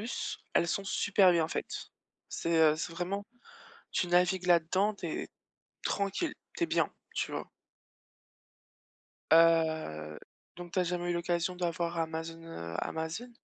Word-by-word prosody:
+, - - -5
elles 170 - +3
sont 200 - -1
super 195 -1 +4
bien 165 -2 +2
faites. - - -4 0.4
C'est, 165 0 0
heu, 155 -1 +6
c'est 165 +2 -4
vraiment 180 +4 -3 0.7
tu 180 - +1
navigues 180 +1 +3
là-dedans, 180 +4 +3
tu 185 -3 -6
es 155 - -3 0.6
tranquille, 200 - -1 0.2
tu - - +1
es 335 - +2
bien, - - +2 0.2
tu - - -2
vois? - - -4 1.8
Heu, 160 - +3 0.4
donc 175 -1 -9
tu 185 - +1
as - - +4
jamais 175 0 -1
eu - - 0
l'occasion 170 +1 0
d'avoir 170 -1 -1
Amazon, 165 0 -3
heu, 85 - -7
Amazon? 160 +10 -3
170 Hz, 145 wpm, -31 LUFS, 165-185 Hz, 1.8 s, heu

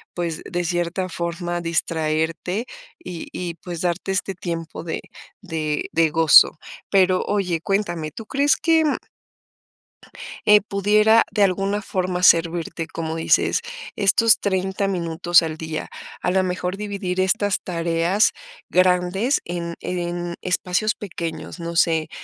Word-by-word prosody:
pues, 170 -3 -3
de 175 -1 -3
cierta 175 +2 -1
forma 175 0 -3
distraerte 165 +4 -1 0.3
y 175 - -7
y 175 -2 -4
pues 175 -2 -6
darte 180 +2 -1
este 190 +1 -1
tiempo 165 -3 -5
de 165 - -4 0.4
de 155 -6 -3
de 165 -1 +3
gozo. 160 0 +6 0.3
Pero, 185 -2 +3
oye, 180 -5 0
cuéntame, 175 -6 -1
¿tú 225 - -9
crees 280 +6 +2
que? 325 -1 +3 1.6
eh, 210 0 +7
¿pudiera 210 +2 +3
de 205 - +2
alguna 195 +2 0
forma 185 -2 -2
servirte 165 -1 +3
como 160 -1 -4
dices, 165 - +2 0.3
estos 215 +3 +5
30 190 0 -1
minutos 175 -1 +2
al 160 -1 -4
día? 160 0 -5 0.3
A - - 0
la 190 0 +2
mejor 180 +1 -2
dividir 200 -3 -3
estas 205 +1 +1
tareas 170 +3 +1 0.4
grandes 185 +7 +2
en 170 -1 -4
en 175 -1 -3
espacios 185 +4 0
pequeños. 170 -3 -6
No 170 0 -5
sé, 160 -2 +2
180 Hz, 125 wpm, -22 LUFS, 165-195 Hz, 1.6 s, eh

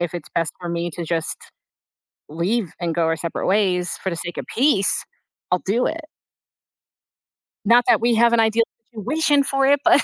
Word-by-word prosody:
if 175 0 -3
it's 175 - -6
best 165 -1 0
for 175 - -6
me 170 0 -2
to 170 - -5
just 165 0 -2 0.9
leave 175 +4 -1
and 170 -2 -2
go 170 - +1
our 160 0 +1
separate 165 +1 -4
ways 185 -3 +1
for 190 - 0
the 170 - -3
sake 175 +1 -5
of - - -4
peace, 230 -6 +2 0.5
I'll 180 - +2
do 230 +6 +1
it. 325 +1 -2 1.6
Not 235 +3 +5
that - - +5
we 235 +1 +2
have 235 +1 +4
an 235 - +4
ideal 225 +1 +3 0.3
situation 285 +6 +1
for 275 0 +1
it, 285 +1 +4
but. 290 - +5
195 Hz, 185 wpm, -21 LUFS, 170-235 Hz, 1.6 s, Not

